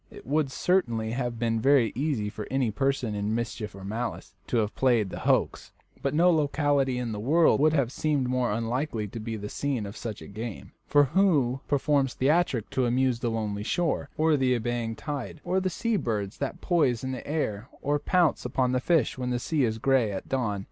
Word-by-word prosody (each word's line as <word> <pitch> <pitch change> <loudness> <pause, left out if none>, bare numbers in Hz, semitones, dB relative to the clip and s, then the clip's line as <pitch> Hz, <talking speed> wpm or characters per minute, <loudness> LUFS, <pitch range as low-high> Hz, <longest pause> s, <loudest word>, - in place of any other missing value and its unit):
It - - -13
would 145 +2 +1
certainly 120 -9 0
have 120 -1 -2
been 115 -1 0
very 135 -3 +4
easy 135 -6 -1
for 105 - -7
any 130 -4 +1
person 135 -1 0
in 105 +1 -1
mischief 115 -3 -4
or 95 - -10
malice 115 +4 -4
to - - 0
have 105 -2 0
played 120 -7 +2
the - - -5
hoax, - - 0 0.3
but 140 +1 -1
no 175 +3 +5
locality 145 -4 +1
in 125 -2 -2
the 105 - -4
wide 110 - -6
world 165 -1 +5
would 155 +1 +4
have 135 -6 +1
seemed 145 -3 0
more 125 -2 0
unlikely 115 +1 -2
to 115 - -7
be 110 +1 -4
the 105 0 -6
scene 130 -1 -2
of 100 +2 -8
such 110 -3 -6
a - - -10
game; 110 +1 -7 0.2
for 145 0 +5
who 140 -6 +2
performs 140 -2 +1
theatricals 135 -5 +1
to 130 -2 +1
amuse 125 0 +1
the 120 - -1
lonely 105 -2 -2
shore, 155 +4 -1
or 155 0 +3
the 130 -2 +2
ebbing 120 -1 -2
tide, 145 +2 -5
or 185 +2 +1
the 185 0 -1
sea 225 +5 -1
birds 105 - -3
that 140 - -4
poise 145 -10 +1
in 130 - -2
the 130 - -6
air 125 -7 -2
or 145 +1 0
pounce 175 0 +2
upon 125 0 0
the 130 - +1
fish 145 -3 +1
when 125 -1 -2
the 125 - 0
sea 145 +4 0
is 110 -2 0
gray 125 -2 +2
at 95 - -5
dawn? 115 -7 -1
125 Hz, 210 wpm, -27 LUFS, 115-145 Hz, 0.3 s, no